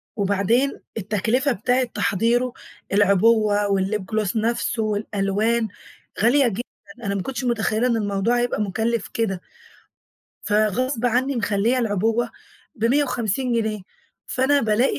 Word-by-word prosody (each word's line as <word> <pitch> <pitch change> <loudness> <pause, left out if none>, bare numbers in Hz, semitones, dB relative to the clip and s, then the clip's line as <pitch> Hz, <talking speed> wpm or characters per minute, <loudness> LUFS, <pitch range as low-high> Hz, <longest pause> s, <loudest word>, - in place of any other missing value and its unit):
وبعدين 205 +6 +1 0.2
التكلفة 220 +7 0
بتاعة 245 +4 +1
تحضيره، 235 +2 0 0.4
العبوة 205 +1 +3
والlip 195 +1 0
gloss 215 -2 0
نفسه، 225 0 0
والألوان، 215 +2 0 0.5
غالية 255 +3 +4
جدًا، 225 +1 -2 0.4
أنا 200 0 -1
ما 195 - -1
كنتش 265 +4 -4
متخيِّلة 235 0 +1
إن 235 - +1
الموضوع 205 +3 0
هيبقى 240 -3 0
مُكلّف 220 +2 -1
كده، 195 -5 -2 1.0
فغصب 225 +4 +1
عنّي 255 +3 +1
مخلّية 225 +3 +1
العبوة 225 +1 0 0.4
ب150 245 -1 0
جنيه، 220 -3 -1 0.5
فأنا 275 +2 +2
بالاقي 220 - +1
225 Hz, 110 wpm, -22 LUFS, 205-245 Hz, 1.0 s, غالية